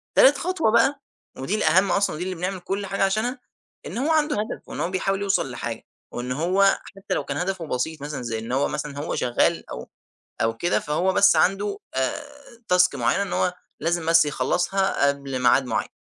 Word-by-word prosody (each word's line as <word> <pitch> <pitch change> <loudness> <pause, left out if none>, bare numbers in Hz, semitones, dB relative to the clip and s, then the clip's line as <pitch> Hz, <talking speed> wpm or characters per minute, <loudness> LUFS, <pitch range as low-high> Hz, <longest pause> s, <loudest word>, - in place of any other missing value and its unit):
تالت - - +7
خطوة 350 -11 0
بقى، 270 +5 +3 0.4
ودي 135 +11 -2
الأهم 185 0 +3
أصلًا، 195 -6 +1
دي 175 - -3
اللي 185 0 -4
بنعمل 185 +2 -3
كل 195 +3 -3
حاجة 195 0 -1
عشانها، 220 +6 -1 0.5
إن - - -6
هو 290 +6 0
عنده 305 -1 +2
هدف 210 +2 -4
وإن - - -6
هو - - -1
بيحاول 195 +1 -1
يوصل 195 -9 0
لحاجة، 120 -1 -5 0.3
وإن 125 +1 -5
هو 185 +8 +2 0.2
حتى 195 - -4
لو - - -1
كان - - -3
هدفه 180 -3 -3
بسيط، 150 +5 -3
مثلًا 145 -2 -5
زي 115 -2 -3
إن 115 +2 -7
هو 135 +2 +1
مثلًا، 145 -1 -5
هو 150 - -3
شغّال 120 -1 0
أو 60 +1 -7 0.5
أو 115 0 0
كده، 175 - +1
فهو 170 +5 0
بس 200 +2 +5
عنده 200 +2 +1 0.2
آآ، 130 - -1 0.5
تاسك 180 0 +4
معيّنة، 200 - +1
إن 195 - -5
هو 180 - +1 0.3
لازم 165 +1 -1
بس 165 -1 +6
يخلَّصها 175 +2 +1
قبل 140 -2 -2
ميعاد 125 +2 +4
معيَّن. 120 - -2
180 Hz, 195 wpm, -24 LUFS, 140-200 Hz, 0.5 s, تالت